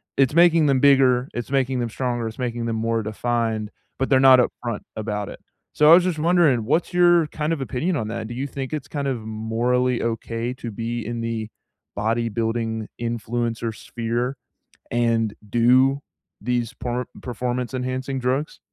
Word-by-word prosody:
It's 135 +1 +2
making 170 -2 +5
them 135 -2 +3
bigger, 130 -2 +4
it's 120 0 -5
making 130 -2 +1
them 120 -1 -1
stronger, 120 -1 -2
it's 110 - -8
making 120 -2 -3
them 115 - -1
more 115 0 0
defined, 110 0 -2 0.3
but 135 - -1
they're 135 -2 +5
not 130 -1 +8
upfront 120 -2 -1
about 105 -2 -3
it. - - -9 0.3
So 150 0 +5
I - - +11
was 180 - +5
just 180 -4 -1
wondering, 160 -8 +3
what's 165 +8 0
your 175 -2 +5
kind 150 +1 -3
of 160 -4 -1
opinion 140 +7 -1
on 110 -7 -2
that? 115 -1 -4
Do 120 - -7
you 130 +3 -2
think 135 0 -5
it's 145 -2 -4
kind 140 -1 -3
of 130 -4 -2
morally 115 +3 0
okay 115 +1 -2
to 125 -2 -7
be 115 +2 -4
in 115 +2 -4
the 115 -1 -3 0.5
bodybuilding 115 0 -1 0.2
influencer 115 -1 -2
sphere 120 +4 -3 0.5
and 115 -2 +1 0.2
do 130 +5 +4 0.4
these 120 +1 -1
por 125 +1 -3 0.2
performance-enhancing 125 +2 -3
drugs? 130 +4 -1
120 Hz, 165 wpm, -23 LUFS, 115-135 Hz, 0.5 s, I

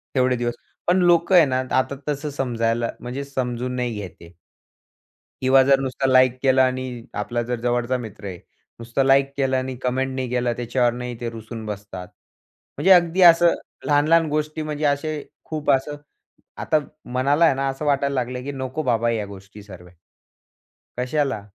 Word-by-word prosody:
तेवढे 130 -1 +3
दिवस 120 0 -2 0.3
पण 175 +1 +4
लोकं 175 +1 +4
आहे 170 -3 +8
ना 130 -2 0 0.2
आता 130 +1 0
तसं 145 +1 -2
समजायला 120 -4 -1
म्हणजे 125 +3 -5
समजून 125 -2 -3
नाही 125 -2 -2
घेत 105 -3 -6
आहे. 85 0 -13 1.1
किंवा 130 +1 +5
जर 135 0 +4
नुसता 135 0 -3
लाइक 130 -1 +4
केलं 130 -1 +4
आणि 130 -2 -1 0.2
आपला 120 +3 -2
जर 120 0 -3
जवळचा 120 +1 0
मित्र 110 -4 -9
आहे. 90 -2 -6 0.4
नुसतं 115 +3 -1
लाइक 135 0 +4
केलं 135 -1 +1
आणि 130 0 -3
कमेंट 130 +1 -1
नाही 130 -2 -3
केलं, 125 -1 0
त्याच्यावर 120 0 +1
नाही 125 -1 -6
ते 120 -1 -3
रुसून 115 0 -8
बसतात. 100 -3 -7 0.7
म्हणजे 190 - +3
अगदी 175 0 +5
असं 170 -1 +7 0.3
लहान-लहान 155 +3 +3
गोष्टी 155 +1 -2
म्हणजे 155 0 -3
असे 145 +1 -1 0.2
खूप 155 -2 -1
असं 135 +2 0 0.7
आता 155 - +2 0.3
मनाला 140 +6 +3
आहे 160 - +4
ना 135 +1 -1
असं 135 +3 -4
वाटायला 140 -1 +1
लागलं 125 0 -3
की 140 - -4
नको 130 +2 -4
बाबा 120 -3 +1
या 110 -3 -2
गोष्टी 100 +1 -12
सर्व्या 90 -3 -13 1.1
कशाला? 130 -4 -1
130 Hz, 165 wpm, -22 LUFS, 120-140 Hz, 1.1 s, आहे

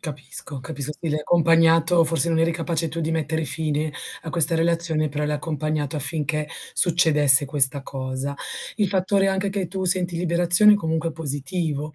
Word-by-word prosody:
Capisco, 145 -2 -7
capisco. 145 0 -5
Sì, 165 - -4
l'hai 150 - -1
accompagnato 165 +1 +3
forse 165 +1 +1
non 165 -1 +1
eri 165 - +2
capace 165 0 -2
tu 165 +2 -5
di 160 0 -2
mettere 160 0 -1
fine 155 0 -1 0.3
a 160 - -6
questa 165 -1 +1
relazione, 165 -2 0
però 150 +1 -3
l'hai 150 0 -1
accompagnato 155 -1 -3
affinché 150 +1 0 0.2
succedesse 150 -5 +4
questa 140 -1 +1
cosa. 135 +1 -5 0.4
Il 210 -3 +1
fattore 195 +1 +1
anche 190 +1 -1
che 195 -3 -3
tu 190 0 -4
senti 180 -1 +1
liberazione, 175 +4 +4
comunque 160 -3 -2
è - - -10
positivo 150 0 -4
160 Hz, 165 wpm, -23 LUFS, 150-170 Hz, 0.4 s, succedesse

